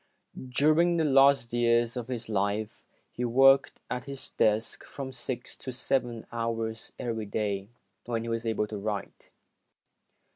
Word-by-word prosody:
During 155 +6 +3
the 165 - +2
last 135 -4 +4
year 120 0 +3
of 120 -2 -4
his 125 -3 -5
life, 105 +1 -1 0.3
he 125 - -4
worked 135 +3 +5
at 125 0 -4
his 140 -1 -7
desk 110 +1 +1
from 135 -1 -7
six 125 -1 -5
to 130 - -6
seven 120 -2 -1
hours 115 -1 -3
every 115 -3 -3
day, 100 -2 -2 0.4
when 115 -2 -1
he 115 - -5
was 115 0 -2
able 110 -1 +1
to 105 -1 -6
write. 105 0 -5
115 Hz, 145 wpm, -28 LUFS, 110-130 Hz, 0.4 s, worked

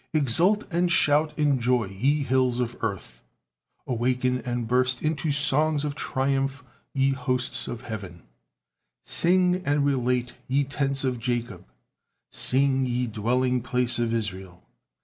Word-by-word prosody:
Exult 165 - +4
and 175 +1 +1
shout 150 -1 +2
in 145 -3 +2
joy, 120 -1 +1
ye 130 +10 0
hills 130 -1 +1
of 120 -1 -2
earth, 65 - -4 0.6
awaken 125 +1 0
and 120 -1 -3
burst 125 +1 +1
into 155 -1 -1
songs 145 +2 +2
of 145 - -2
triumph, 135 -1 -1 0.3
ye 135 0 +2
hosts 125 -1 0
of 120 -1 -6
heaven. 100 - -8 0.8
Sing 180 +1 +2
and 145 -2 +1
relate, 125 -3 0
ye 140 +2 +1
tents 140 0 -1
of 130 -2 -1
Jacob, 120 -5 -3 0.7
sing, 135 0 +1
ye 125 0 -1
dwelling 125 +3 0
place 125 0 0
of 120 -1 0
Israel. 95 -5 -5
130 Hz, 130 wpm, -25 LUFS, 120-140 Hz, 0.8 s, Exult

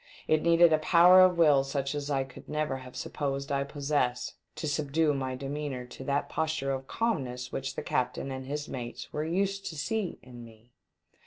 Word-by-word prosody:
It 155 0 +3
needed 170 0 +5
a 155 - +4
power 175 +3 +7
of 185 -1 +5
will 150 -5 +5
such 135 0 -2
as 145 0 -4
I 135 -2 +1
could 130 -1 -13
never 150 -3 -1
have 130 -1 -11
supposed 140 -1 -3
I 140 0 +1
possessed 140 -3 -1 0.2
to 155 - -4
subdue 150 +1 +1
my 130 -2 -2
demeanour 135 -1 -4
to 125 - -10
that 140 +1 0
posture 155 -3 -1
of 135 0 -4
calmness 130 - -2
which 135 0 -4
the - - -4
captain 130 +2 -1
and 130 0 -6
his 150 +1 -3
mates 120 -2 -7
were 150 - -1
used 195 +4 -1
to 160 - -6
see 205 +5 -2
in 120 -2 -11
me. 115 +1 -16
140 Hz, 190 wpm, -29 LUFS, 130-155 Hz, 0.2 s, power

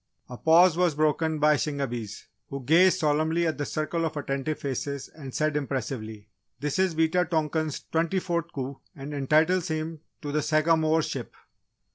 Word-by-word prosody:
A 125 - -7
pause 165 +5 +5
was 175 -4 +2
broken 155 +1 +1
by 150 0 +4
Shingebis, 120 -8 -4 0.2
who 140 -1 -6
gazed 175 +6 +5
solemnly 160 +3 +1
at 160 -2 -1
the 145 - -2
circle 160 +2 -2
of 160 -2 -2
attentive 140 +1 -2
faces 140 0 -4
and 140 -4 -10
said 155 +2 0
impressively: 120 -6 -4 0.3
"This 150 +4 -2
is 190 -3 +2
Wita 160 +3 +2
tonkan's 155 -2 -1
twenty 165 +3 +1
fourth 170 -2 -2
coup 135 0 -5 0.2
and 145 +1 -7
entitles 155 +6 +2
him 160 0 -3 0.2
to 145 - -3
the 150 +1 +1
Sagamore 155 +1 +2
ship!" - - -5
155 Hz, 160 wpm, -27 LUFS, 140-165 Hz, 0.3 s, pause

